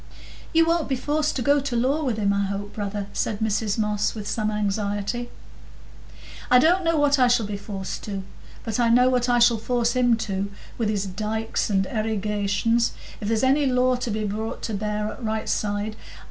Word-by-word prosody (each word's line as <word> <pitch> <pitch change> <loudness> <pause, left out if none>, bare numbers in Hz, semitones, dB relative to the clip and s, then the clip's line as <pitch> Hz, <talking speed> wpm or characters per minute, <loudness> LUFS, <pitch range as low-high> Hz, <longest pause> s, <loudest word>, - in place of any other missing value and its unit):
"You 330 0 +4
won't 330 -2 +1
be 270 - +1
forced 295 +4 -1
to 250 - -1
go 285 +1 +4
to 275 -3 -3
law 265 +6 +1
with 245 -6 -1
him, 200 -2 +2
I 200 0 +1
hope, 200 +1 -4
brother?" 205 -1 -3
said 210 - -1
Mrs 215 -1 0
Moss, 210 -1 0
with 210 -2 -6
some 215 -1 -1
anxiety. 205 +3 -2 1.2
"I 250 - +7
don't 345 +8 +4
know 330 -1 +2
what 290 -1 +3
I 250 - +6
shall 240 -2 +3
be 205 0 -4
forced 200 -1 -5
to; 195 -2 -4 0.4
but 225 +1 -2
I 235 -1 +3
know 250 +2 +5
what 250 -1 +1
I 245 - +4
shall 235 -1 +5
force 240 +1 +1
him 245 -2 +3
to, 200 -3 -2 0.3
with 225 -2 +1
his 205 -2 -1
dikes 215 +5 -2
and 195 -2 +2
erigations, 215 +1 0 0.3
if 205 - -4
there's 225 +1 +1
any 275 +2 +3
law 255 0 +3
to 245 - -3
be 215 0 -2
brought 220 +3 -4
to 225 - -3
bear 210 +1 -2
o' - - -9
the - - -14
right 220 -1 -2
side. 205 +1 -1
220 Hz, 200 wpm, -24 LUFS, 205-250 Hz, 1.2 s, I